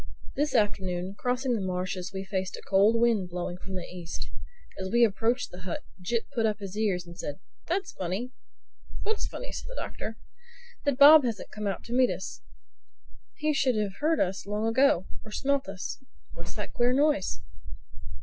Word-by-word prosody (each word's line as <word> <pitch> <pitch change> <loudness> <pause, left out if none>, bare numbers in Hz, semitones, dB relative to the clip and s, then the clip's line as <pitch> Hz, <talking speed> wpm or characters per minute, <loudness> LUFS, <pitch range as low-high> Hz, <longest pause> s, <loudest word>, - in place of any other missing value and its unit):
This 295 +2 +1
afternoon, 190 -3 +1
crossing 250 +3 0
the 220 - 0
marshes 185 0 -2
we 190 -1 -4
faced 190 -1 -2
a - - -9
cold 205 +4 +5
wind 225 -6 +3
blowing 175 0 -4
from 190 0 -7
the 180 - -3
East. 175 -2 -6 0.5
As 190 0 -3
we 235 +3 +5
approached 230 +3 +2
the 180 - -9
hut 180 -1 -4 0.2
Jip 230 +5 0
put 225 -4 +2
up 210 -2 0
his 200 -2 -7
ears 200 -5 +1
and 170 0 -11
said, 145 -2 -5 0.3
"That's 365 +2 -1
funny!" 195 - -3 0.7
"What's 435 0 -1
funny?" - - -6
asked - - -6
the - - -8
Doctor. 225 +1 -5 0.7
"That 285 -3 +2
Bob 290 +2 +10
hasn't 230 -4 -3
come 210 -1 -3
out 195 - -2
to 235 - -6
meet 255 0 +5
us. - - -5 0.9
He 305 0 +1
should 265 -3 +2
have 205 -3 -1
heard 315 +1 +2
us 190 +1 0
long 210 +2 -1
ago—or 225 -4 +2
smelt 275 0 0
us. 195 +5 -5 0.3
What's - - -7
that - - -5
queer 245 0 +3
noise?" 275 - +2
210 Hz, 180 wpm, -28 LUFS, 185-255 Hz, 0.9 s, Bob